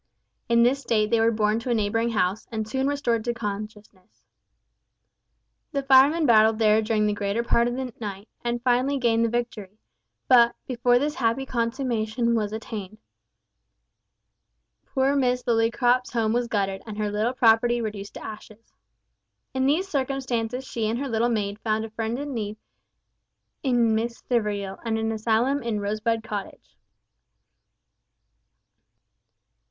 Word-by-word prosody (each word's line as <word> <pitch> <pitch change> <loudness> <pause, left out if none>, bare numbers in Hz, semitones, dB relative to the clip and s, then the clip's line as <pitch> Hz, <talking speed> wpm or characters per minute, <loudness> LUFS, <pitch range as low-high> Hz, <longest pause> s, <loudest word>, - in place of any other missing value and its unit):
In 235 0 +5
this 265 +3 +2
state 215 -4 0
they 230 - +3
were 225 +1 +4
borne 215 -1 +1
to 230 - -6
a 240 - +2
neighbouring 225 +2 0
house, 205 -2 -1
and 220 -1 -3
soon 265 +4 -1
restored 260 -6 0
to 240 0 -2
consciousness. 210 -3 -7 1.5
The 280 -1 -1
firemen 275 +4 +5
battled 220 -3 +5
there 215 -1 +4
during 215 -1 +1
the 210 - +1
greater 205 +3 -1
part 235 0 +2
of 245 - -2
that 255 -3 -6
night, 200 0 -6 0.2
and 240 0 -2
finally 255 +3 +2
gained 230 -3 +2
the 230 - +2
victory; 220 -4 -4 0.5
but, 235 -2 +6
before 245 -1 +2
this 295 +4 0
happy 240 +1 0
consummation 235 -2 -1
was 210 -3 0
attained, 215 -2 -6 1.9
poor 270 +1 +1
Miss 250 -2 +1
Lillycrop's 240 +2 +1
home 225 -2 +1
was 240 0 0
gutted 195 -3 -1
and 210 -1 -7
her 210 -1 -1
little 215 +4 0
property 240 0 +3
reduced 210 -3 -5
to - - -8
ashes. 215 +1 -11 0.8
In 260 0 +1
these 330 +7 +1
circumstances 260 -5 -2
she 225 -4 -2
and 230 - -1
her 275 +1 -3
little 230 +1 +1
maid 205 -3 -2
found 220 0 -1
a 225 - -10
friend 225 +1 -3
in 285 0 -5
need 215 -2 -4 1.0
in 240 -4 +2
Miss 230 +2 -1
Stivergill, 205 -5 -2
and 225 -1 -1
an 225 0 -1
asylum 230 +5 +1
in 230 -3 -2
Rosebud 215 +2 -1
Cottage. 205 -3 -7
230 Hz, 145 wpm, -25 LUFS, 215-245 Hz, 1.9 s, but